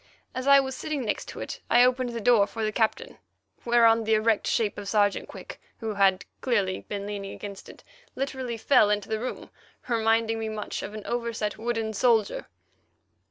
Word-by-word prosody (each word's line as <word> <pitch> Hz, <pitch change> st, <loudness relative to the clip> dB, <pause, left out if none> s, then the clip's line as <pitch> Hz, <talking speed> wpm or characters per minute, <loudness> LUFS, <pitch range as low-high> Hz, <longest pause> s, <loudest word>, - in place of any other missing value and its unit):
As 255 Hz, +1 st, -4 dB
I 280 Hz, 0 st, +8 dB
was 265 Hz, -1 st, -2 dB
sitting 290 Hz, -4 st, -3 dB
next 210 Hz, -, -2 dB
to -, -, -8 dB
it, -, -, -6 dB
I 240 Hz, +1 st, +6 dB
opened 255 Hz, 0 st, +2 dB
the 235 Hz, -1 st, -4 dB
door 220 Hz, -2 st, +4 dB
for 225 Hz, -, -5 dB
the 215 Hz, -, 0 dB
Captain, 245 Hz, -, -1 dB, 0.5 s
whereon 230 Hz, -1 st, +5 dB
the 220 Hz, 0 st, +2 dB
erect 215 Hz, 0 st, +1 dB
shape 215 Hz, -3 st, 0 dB
of 200 Hz, -, -7 dB
Sergeant 205 Hz, -1 st, +1 dB
Quick, -, -, -10 dB, 0.2 s
who 220 Hz, -2 st, -4 dB
had 195 Hz, -2 st, +3 dB, 0.2 s
clearly 205 Hz, -7 st, 0 dB
been 200 Hz, -1 st, -4 dB
leaning 200 Hz, -1 st, -5 dB
against 200 Hz, -1 st, -9 dB
it, -, -, -14 dB, 0.3 s
literally 260 Hz, -3 st, -3 dB
fell 220 Hz, -2 st, +4 dB
into 210 Hz, 0 st, -1 dB
the 220 Hz, 0 st, -1 dB
room, 250 Hz, +3 st, -6 dB, 0.4 s
reminding 225 Hz, -1 st, +1 dB
me 220 Hz, 0 st, -3 dB
much 215 Hz, -1 st, -4 dB
of 210 Hz, -, -7 dB
an 215 Hz, -, -8 dB
overset 235 Hz, -3 st, -3 dB
wooden 225 Hz, -1 st, -2 dB
soldier. 220 Hz, -1 st, +1 dB
225 Hz, 185 wpm, -26 LUFS, 210-240 Hz, 0.5 s, I